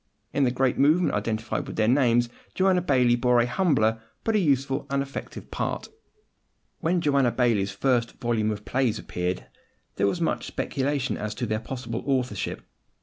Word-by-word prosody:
In 140 -1 +3
the - - +3
great 130 0 0
movement 155 +6 +4
identified 110 +2 -2
with - - -6
their 110 - +2
names 120 -2 +4 0.3
Joanna 185 -1 +3
Baillie 125 -8 +3
bore 125 0 +3
a 120 - +4
humbler, 120 - +2 0.2
but 225 - +1
a - - +4
useful 135 -5 +1
and 140 0 +1
effective 140 - -8
part. - - -3 0.9
When 175 +2 +1
Joanna 140 -5 +3
Baillie's 115 -5 +2
first 120 +3 +1
volume 115 -3 0
of 105 -1 -4
plays 120 +1 +1
appeared, 90 - -3 0.5
there 100 - +3
was 170 - -1
much 165 - -1
speculation 135 -1 -1
as 105 0 -4
to 125 - -2
their 110 -1 -1
possible 120 0 -5
authorship. 125 -7 -1
125 Hz, 165 wpm, -26 LUFS, 110-140 Hz, 0.9 s, movement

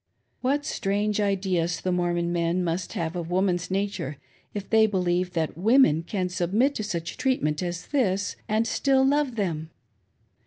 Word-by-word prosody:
What 285 +3 0
strange 205 -5 0
ideas 185 -4 0
the 185 - -1
Mormon 175 -1 0
men 170 +1 +1
must 175 +2 -2
have 170 -4 -3
of 170 -2 -4
woman's 180 -1 +1
nature 190 -7 -2 0.3
if 205 -2 -5
they 220 -1 +5
believe 180 -2 0
that 160 -2 -1
women 210 - +4
can 185 +2 -2
submit 190 +10 +1
to 215 - -3
such 170 -5 -4
treat 260 - 0
ment 150 0 0
as 175 -1 -4
this 200 -9 0
and 215 +2 +2
still 265 +3 +2
love 280 -2 +1
them 165 -7 -2
185 Hz, 160 wpm, -26 LUFS, 175-215 Hz, 0.3 s, they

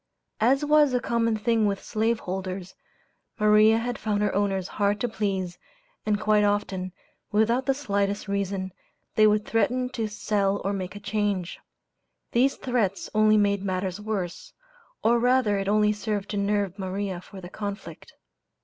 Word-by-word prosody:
As 270 +6 +3
was 295 -3 +4
a - - +3
common 230 -2 0
thing 220 0 +2
with 200 -1 -2
slave 225 +1 0
holders, 185 0 -5 0.7
Maria 215 +1 +5
had 240 +1 -3
found 210 -1 0
her 205 - 0
owners 195 -2 0
hard 205 0 0
to 245 - +1
please, 190 -5 -3 0.5
and 210 -1 +2
quite 210 -1 +3
often, 195 -3 -1 0.4
without 230 +5 +2
the 270 - +3
slightest 200 -6 -1
reason, 195 -2 -2 0.4
they 215 0 +5
would 210 0 +2
threaten 250 +3 +1
to 230 -4 -3
"sell 205 -1 0
or 200 - 0
make 185 -1 -4
a - - -7
change." 205 -3 -2 0.7
These 260 +3 +3
threats 225 -7 -1
only 215 0 +5
made 200 -1 +2
matters 185 0 -2
worse, 210 - -4 0.5
or 235 +1 +4
rather 245 -4 +3
it 195 - -3
only 210 +1 +3
served 205 -1 -3
to 205 - -3
nerve 200 -1 0
Maria 190 -1 -3
for 195 +1 -12
the 180 - -9
conflict. 200 -5 -7
205 Hz, 160 wpm, -26 LUFS, 195-220 Hz, 0.7 s, Maria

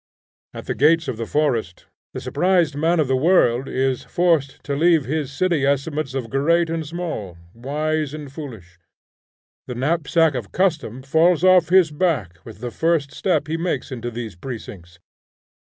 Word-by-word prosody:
At - - -7
the - - -2
gates 165 +3 +3
of 115 - -3
the 115 -1 -4
forest, 120 - -1 0.3
the - - -3
surprised 175 -5 +1
man 165 +3 +1
of 150 - +2
the 130 - +1
world 130 -4 +3
is 130 -1 -1
forced 165 -6 0
to 140 - -3
leave 165 -1 +3
his 145 +1 -2
city 170 0 0
estimates 140 0 -1
of 125 -4 -4
great 165 +5 +2
and 165 -1 -2
small, 155 - -5 0.2
wise 150 +4 -2
and 150 -2 -8
foolish. 110 - -10 0.9
The 125 - -5
knapsack 160 +3 +2
of 120 -6 -5
custom 150 - -1
falls 160 +5 +3
off 185 -3 +5
his 180 -3 +5
back 145 - -1
with 110 -2 -12
the 120 -1 -4
first 160 -2 0
step 165 -6 0
he 160 +1 -2
makes 170 -3 -3
into 120 -2 -4
these 115 -4 -6
precincts. 90 -5 -9
145 Hz, 165 wpm, -21 LUFS, 125-165 Hz, 0.9 s, off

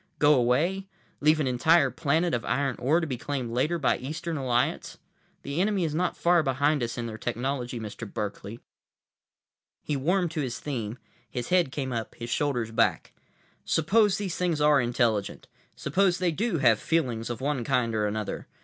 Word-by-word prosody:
Go 150 0 +5
away? 150 +10 +1 0.3
Leave 155 +2 +4
an 150 - +1
entire 130 +7 +3
planet 165 +1 0
of 120 - -1
iron 135 -1 0
ore 150 +7 +2
to - - -1
be 130 -6 -4
claimed 130 -5 -3
later 140 +8 +1
by 140 - +1
Eastern 160 +5 -4
Alliance? 125 -3 -1 0.5
The 140 +5 -2
enemy 200 -2 +1
is 155 -3 -1
not 175 +3 -1
far 175 0 +4
behind 145 +1 +1
us 120 +1 -3
in 120 - -3
their 110 -1 -6
technology, 125 +1 -3
Mr. 110 0 -7
Berkeley." 105 +2 -5 1.2
He 150 - -2
warmed 175 +5 +1
to 160 -2 -2
his 125 -3 -3
theme, 120 -6 -4 0.3
his 120 +1 -5
head 180 -6 +3
came 135 -2 -3
up, 115 -1 -4
his 120 0 -7
shoulders 125 -6 0
back. 115 - +1 0.5
"Suppose 195 +5 +3
these 195 -4 -3
things 175 -4 0
are 150 -2 +5
intelligent. 120 -4 0 0.3
Suppose 180 +5 +1
they 180 -2 +1
do 205 +3 -1
have 120 -6 +4
feelings 125 -9 -1
of 120 -2 -4
one 140 -2 -1
kind 125 -3 0
or 105 -1 +1
another. 105 0 -4
140 Hz, 175 wpm, -27 LUFS, 120-165 Hz, 1.2 s, Go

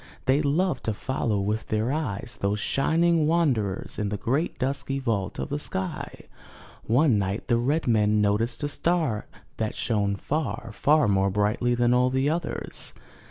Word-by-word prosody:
They 135 +3 +3
loved 155 +1 0
to 110 - -1
follow 115 -4 -1
with 105 +2 -2
their 110 +3 0
eyes 140 -10 -3
those 100 +1 0
shining 165 +5 +2
wanderers 130 - 0
in 105 -1 -1
the 105 - -2
great 140 - -1
dusky 135 0 -1
vault 110 -7 -2
of - - -4
the 145 +1 -2
sky. 95 -9 -4 0.6
One 120 -1 +4
night 100 +2 -2
the 120 -1 +3
red 145 +7 0
men 105 -2 +3
noticed 105 +5 +1
a - - +1
star 155 -7 0 0.3
that 110 -1 -2
shone 100 -3 0
far, 115 -3 -3
far 150 +4 +3
more 100 -1 +2
brightly 105 +5 +1
than 120 0 +3
all 125 +1 +3
the 130 +3 +1
others. 165 -1 -4
120 Hz, 160 wpm, -26 LUFS, 105-145 Hz, 0.6 s, One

